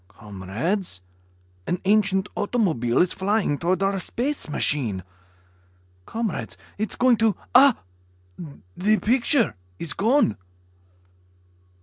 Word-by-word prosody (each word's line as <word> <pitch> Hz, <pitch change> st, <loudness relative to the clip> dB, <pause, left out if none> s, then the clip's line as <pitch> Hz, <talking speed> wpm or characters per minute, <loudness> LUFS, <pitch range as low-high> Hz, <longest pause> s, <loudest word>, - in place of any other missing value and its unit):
Comrades... 105 Hz, -, -4 dB, 0.7 s
an 180 Hz, -, -1 dB
ancient 195 Hz, -1 st, +2 dB
automobile 175 Hz, -, +1 dB
is 180 Hz, -, -2 dB
flying 195 Hz, -6 st, 0 dB
toward 180 Hz, +2 st, 0 dB
our 195 Hz, 0 st, 0 dB
space 260 Hz, -, -3 dB
machine. 115 Hz, -11 st, 0 dB, 1.0 s
Comrades... 225 Hz, -3 st, -4 dB, 0.2 s
it 215 Hz, -, -1 dB
is -, -, -6 dB
going 250 Hz, -2 st, +4 dB
to 220 Hz, -2 st, +2 dB, 0.2 s
Ah... 265 Hz, -1 st, +7 dB, 1.0 s
the 215 Hz, +3 st, +2 dB
picture 235 Hz, -, +2 dB, 0.2 s
is 160 Hz, -3 st, -2 dB
gone." 225 Hz, -, +2 dB
195 Hz, 100 wpm, -24 LUFS, 155-225 Hz, 1.0 s, Ah